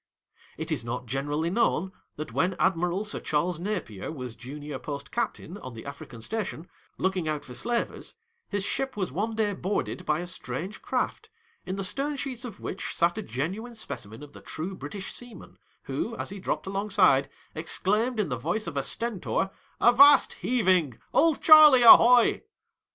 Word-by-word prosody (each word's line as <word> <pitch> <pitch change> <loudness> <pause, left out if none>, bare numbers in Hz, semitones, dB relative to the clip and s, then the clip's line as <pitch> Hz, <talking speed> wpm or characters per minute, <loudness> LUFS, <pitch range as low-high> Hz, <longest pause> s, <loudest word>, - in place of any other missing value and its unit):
It - - -4
is - - -1
not 125 +2 -4
generally 145 +6 -2
known 190 -4 +1 0.2
that 155 - -7
when 180 +2 +1
Admiral 180 +2 +1
Sir 215 - -2
Charles 160 +3 -1
Napier 175 - -4
was 125 -6 -7
junior 145 +3 -7
post 140 -2 -7
captaia 210 -5 -4
on 130 -2 -8
the 115 - -9
African 140 -4 -9
station, 180 - -4 0.3
looking 185 -3 -1
out 150 -1 -3
for 125 - -10
slavers, 235 - -3 0.3
his 205 -1 -1
ship 265 +4 -2
was 190 -7 -2
one 215 - -2
day 215 -2 0
boarded 190 -1 -3
by 155 -1 0
a - - -5
strange 175 +2 -5
craft, - - -2 0.4
in 185 - -2
the 195 - -3
stern 275 +10 -1
sheets 255 -2 -5
of 220 -5 -9
which 190 - -5
sat 175 +4 +2
a - - -2
genuine 195 - -4
specimen 110 - -7
of 145 - -13
the - - -12
true 170 +5 -5
British 190 +4 -7
seaman, 240 -6 -9 0.2
who, 145 - -3
as - - -3
he 200 - -7
dropped - - -3
alongside, 195 -8 +2 0.2
exclaimed 210 +9 0
in 205 - 0
the 125 - -2
voice 175 - -2
of - - -5
a - - +1
Stentor, 205 -4 -2
" - - -35
Avast 280 +3 +7
heaving! 185 - +2 0.2
Old 325 -3 +3
Charley, 305 -5 +9
ahoy 240 +1 +8
185 Hz, 175 wpm, -27 LUFS, 150-220 Hz, 0.4 s, Charley